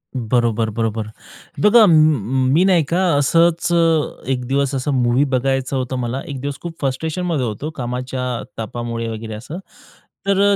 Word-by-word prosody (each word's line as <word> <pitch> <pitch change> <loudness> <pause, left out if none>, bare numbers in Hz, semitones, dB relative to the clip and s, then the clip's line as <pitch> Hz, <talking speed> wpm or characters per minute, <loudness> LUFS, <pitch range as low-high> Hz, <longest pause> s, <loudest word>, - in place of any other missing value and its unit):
बरोबर, 115 -2 0
बरोबर. 110 -1 -2 0.5
बघा 215 +2 +6
म 140 - +3
मी 170 - +4
नाही 180 -4 +4
का 180 +2 +2
असच 165 +4 +2
अ, 165 -2 +1
एक 125 -1 -2
दिवस, 140 +1 0
असं 135 +2 -1
मूव्ही 120 +3 +3
बघायचं 135 +1 0
होतं 130 0 -3
मला, 125 +2 -3
एक 140 -2 -5
दिवस 140 0 -4
खूप 170 -1 -6
फ्रस्ट्रेशनमध्ये 155 +2 -2
होतो 115 +7 -4
कामाच्या 125 0 -4 0.4
तापामुळे 115 0 -4
वगैरे 110 0 -6
असं. 120 +10 -7 0.7
तर 200 -1 +2
अ, - - +3
130 Hz, 155 wpm, -19 LUFS, 120-160 Hz, 0.7 s, बघा